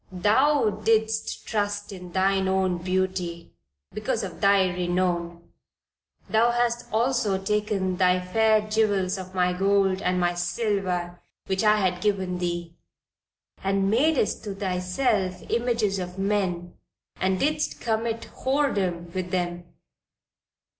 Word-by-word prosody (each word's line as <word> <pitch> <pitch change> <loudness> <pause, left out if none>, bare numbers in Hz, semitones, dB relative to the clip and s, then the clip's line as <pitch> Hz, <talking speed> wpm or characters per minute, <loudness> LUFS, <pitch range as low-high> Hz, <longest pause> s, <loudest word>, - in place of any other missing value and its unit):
"Thou 215 +4 +2
didst 220 0 +1
trust 205 -1 -2
in 180 -2 -9
thine 190 +1 +2
own 190 -2 +1
beauty, 185 -2 -2 0.4
because 220 +1 -2
of 185 -4 -7
thy 200 -1 +5
renown. 175 -1 -2 0.8
Thou 225 +2 +3
hast 240 0 0
also 230 -3 +1
taken 195 -2 -1
thy 180 -1 +3
fair 215 +4 +3
jewels 205 -3 +1
of 185 0 -9
my 180 0 +2
gold 195 0 +2
and 180 0 0
my 175 0 +1
silver 180 -1 -2 0.2
which 190 +2 -1
I 215 0 +5
had 180 -3 0
given 190 -3 0
thee, 175 -1 -3 0.9
and 195 0 +1
madest 265 -1 +2
to 200 -2 -4
thyself 185 +1 -1
images 230 -4 +1
of 180 0 -6
men, 190 -3 -1 0.4
and 185 0 0
didst 300 +1 0
commit 225 0 -2
whoredom 195 -12 -1
with 185 -1 -3
them. 175 -1 -2
195 Hz, 120 wpm, -25 LUFS, 180-215 Hz, 0.9 s, thy